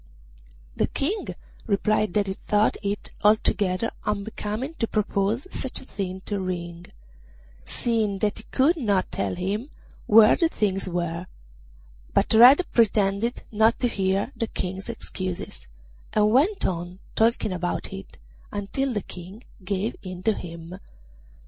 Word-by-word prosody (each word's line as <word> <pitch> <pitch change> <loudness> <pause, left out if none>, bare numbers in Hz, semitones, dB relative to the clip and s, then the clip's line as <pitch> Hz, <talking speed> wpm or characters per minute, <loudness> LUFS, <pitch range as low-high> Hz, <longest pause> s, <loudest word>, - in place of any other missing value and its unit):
The - - +1
King 380 +10 -2 0.4
replied 215 -1 +1
that 205 -1 +3
he 190 - -2
thought 210 +2 +1
it 200 0 -3
altogether 210 -1 +2
unbecoming 210 +6 -3
to 230 - +1
propose 210 +3 0
such 265 - -3
a - - -12
thing 190 -5 -5
to 205 +1 -3
Ring, 175 -2 -4 0.8
seeing 220 -4 0
that 210 +1 0
he 220 - -11
could 295 +6 +2
not 205 -9 +1
tell - - -1
him 200 +9 -2 0.4
where 215 0 +8
the 330 - +2
things 195 - 0
were; 170 0 -2 0.9
but - - +4
Red 250 +10 +8
pretended 210 0 +2
not 220 +2 +4
to 245 - +1
hear 195 -3 0
the 230 - -2
King's 190 0 -4
excuses, 185 - -5 0.5
and 210 0 +4
went 325 - +3
on 175 0 -2 0.2
talking 225 -2 +2
about 175 0 -3
it 95 - -9 0.3
until 245 +7 -2
the 210 - -1
King 185 +6 -10 0.2
gave 195 +3 -1
in 185 -1 -7
to 220 - +3
him. 170 0 -8
205 Hz, 135 wpm, -25 LUFS, 185-225 Hz, 0.9 s, where